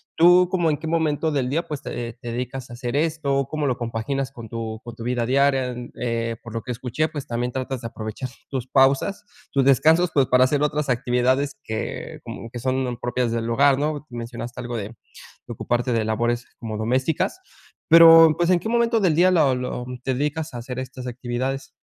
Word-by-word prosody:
tú 175 +2 +6
como, 175 -3 +2
¿en 150 - +2
qué - - -9
momento 160 -1 0
del 130 -3 0
día 165 +5 -1
pues 150 -3 -5
te 120 -1 -5
te 120 - -5
dedicas 125 +1 -5
a - - -9
hacer 120 +1 -4
esto, 145 -4 0
cómo 155 -1 -2
lo 125 -2 0
compaginas 125 +4 -3
con 115 -4 -10
tu 115 -1 -5
con 120 -1 -8
tu 115 - -8
vida 120 -1 -1
diaria? 135 0 +2 0.3
Eh, 115 -1 -1
por 115 -1 -9
lo 115 - -3
que 125 - -5
escuché, 125 +6 -1
pues, 150 -4 -6
también 120 +1 -3
tratas 130 -1 -3
de 115 - -4
aprovechar 110 +3 -6 0.2
tus 130 -2 -4
pausas, 135 +10 +2 0.3
tus 140 - +2
descansos, 160 +6 +4
pues 135 -3 +3
para 125 0 +5
hacer 145 +2 +2
otras 150 -1 0
actividades 125 +2 +1
que 110 0 -5
como 115 - -8
que 120 - -6
son 130 -1 -1
propias 120 -1 -1
del 115 0 -2
hogar, 140 +3 +4
¿no? 150 0 -2
Mencionaste 120 0 -6
algo 120 -1 -5
de 100 -1 -4 0.6
de - - -5
ocuparte 120 +1 -1
de 115 - +1
labores 120 +2 0
como 110 -3 -5
domésticas. 130 - 0 0.5
Pero 165 -1 +9
pues, 175 0 +1
¿en 180 - +4
qué 220 - -4
momento 235 -1 +2
del 175 -6 +2
día 185 +2 +5
lo 145 -7 +3
lo 125 -1 -4 0.2
te 130 - 0
dedicas 150 +4 -2
a - - -5
hacer 125 +2 -7
estas 130 -1 -7
actividades? 130 +2 -4
130 Hz, 205 wpm, -23 LUFS, 120-150 Hz, 0.6 s, Pero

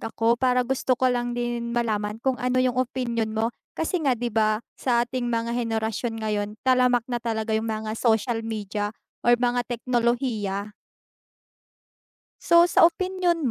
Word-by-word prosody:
ako 230 +1 0
para 250 -1 +3
gusto 260 0 +1
ko 255 +1 +2
lang 245 0 -2
din 240 -1 -2
malaman 215 -3 -1
kung 265 -1 0
ano 250 +1 0
yung 255 -1 0
opinyon 240 -3 -1
mo, 225 +2 0 0.2
kasi 335 +2 -1
nga, 270 -3 +3
'di 240 +1 -3
ba, 215 0 +2 0.2
sa 240 -2 +2
ating 250 0 -3
mga 230 0 -1
henerasyon 225 -1 -2
ngayon 210 -2 -1 0.2
talamak 250 -2 +3
na 240 -1 -1
talaga 220 -1 -2
yung 220 +1 -1
mga 215 0 -3
social 225 0 +1
media 210 -2 -3 0.3
or 240 0 +5
mga 245 0 +1
teknolohiya. 235 -4 -1 1.7
So, 340 +1 +5
sa 330 - +7
opinyon 350 -4 0
240 Hz, 150 wpm, -25 LUFS, 220-250 Hz, 1.7 s, sa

